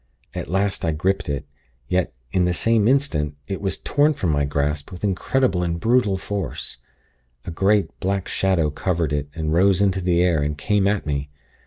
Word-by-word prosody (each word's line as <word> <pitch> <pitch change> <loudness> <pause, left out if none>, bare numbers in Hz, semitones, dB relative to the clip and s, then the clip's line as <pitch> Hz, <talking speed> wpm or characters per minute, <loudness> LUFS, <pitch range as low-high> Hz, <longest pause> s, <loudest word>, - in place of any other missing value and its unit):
At - - -5
last, 95 +2 0
I 80 -2 +1
gripped 95 +3 0
it; 70 - -2 0.4
yet, 90 +3 0 0.2
in 90 -1 +2
the 90 0 +1
same 115 +2 +2
instant, 100 - +1
it 95 - -4
was 95 -1 -1
torn 145 +1 +2
from 90 -9 0
my 70 -1 +1
grasp 75 +3 -2
with 90 +1 -9
incredible 100 +1 +1
and 85 -1 -1
brutal 110 -2 +2
force. 100 -9 -4 0.7
A - - -4
great, 100 +4 +1
black 95 0 -1
shadow 90 -6 +1
covered 85 -2 -1
it, 75 0 -2
and 80 -2 -1
rose 95 +2 +4
into 95 -2 +2
the 90 -1 +2
air, 85 -4 +2
and 75 0 -2
came 100 +5 +1
at 100 -1 0
me. 70 -1 -2
90 Hz, 185 wpm, -22 LUFS, 75-100 Hz, 0.7 s, rose